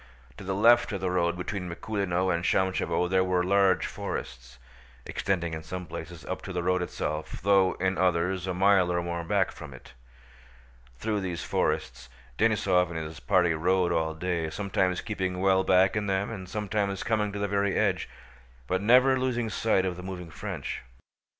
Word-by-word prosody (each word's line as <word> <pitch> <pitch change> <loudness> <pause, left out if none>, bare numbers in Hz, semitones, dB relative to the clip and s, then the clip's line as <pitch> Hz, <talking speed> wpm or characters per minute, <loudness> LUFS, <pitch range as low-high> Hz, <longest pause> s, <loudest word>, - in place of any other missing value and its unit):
To - - -9
the 95 0 -2
left 120 +4 +5
of 100 - -2
the 95 -1 -1
road 85 -1 +1
between 90 0 -4
Mikúlino 95 -1 -1
and 85 0 -2
Shámshevo 95 -1 +1
there 95 +1 +2
were 90 -1 +1
large 95 -1 +3
forests, 60 0 -6 0.5
extending 85 -4 -2
in 80 - -4
some 90 +3 -6
places 85 0 -8
up 95 - -4
to 100 - -7
the 90 -1 -2
road 90 +1 +1
itself 75 -3 -4
though 95 -1 +4
in 95 0 -1
others 90 +1 +1
a 95 - -1
mile 95 -1 +4
or 85 0 0
more 85 0 -3
back 80 - +1
from - - -10
it. - - -15 1.0
Through 105 - -1
these 90 -3 -4
forests 65 0 -2 0.3
Denísov 95 -5 +3
and 85 - -5
his 80 0 -6
party 85 0 +2
rode 90 +2 +1
all 80 -1 0
day, 85 -1 -2
sometimes 95 +1 -1
keeping 95 -4 -3
well 95 0 +3
back 95 0 +4
in 105 -1 -1
them 95 +2 0
and 95 -4 -7
sometimes 105 -2 -2
coming 105 -2 0
to 100 - -6
the 100 0 -1
very 100 0 0
edge, - - 0 0.6
but 95 +7 -1
never 130 +4 +5
losing 120 -3 -1
sight 105 -3 +1
of 90 -2 -2
the - - -7
moving 90 -3 -7
French. 75 - -5
95 Hz, 180 wpm, -28 LUFS, 85-100 Hz, 1.0 s, left